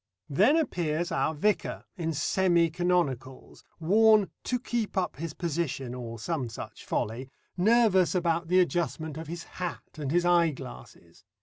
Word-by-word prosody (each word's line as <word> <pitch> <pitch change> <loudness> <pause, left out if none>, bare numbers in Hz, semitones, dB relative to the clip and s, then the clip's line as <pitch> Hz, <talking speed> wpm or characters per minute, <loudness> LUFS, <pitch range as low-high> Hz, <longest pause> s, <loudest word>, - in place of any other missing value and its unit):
Then 210 - +4
appears 175 - -1
our 160 -1 0
vicar 210 +8 0
in 165 -4 -2
semi 170 +2 +2
canonicals, 160 -8 -1 0.2
worn 210 +4 +4
"to 250 - 0
keep 235 -4 -3
up 185 -6 -1
his 165 +1 -5
position," 150 -7 -2
or 120 -2 -6
some 130 +1 -3
such 115 - -9
folly, 120 +5 -3 0.3
nervous 195 -2 +4
about 170 -1 0
the 180 +2 +4
adjustment 165 -4 0
of 160 0 -7
his 170 +1 -6
hat 180 -3 -7
and 145 -3 -3
his 175 +1 +2
eyeglasses. 165 -7 -1
170 Hz, 140 wpm, -28 LUFS, 150-185 Hz, 0.3 s, Then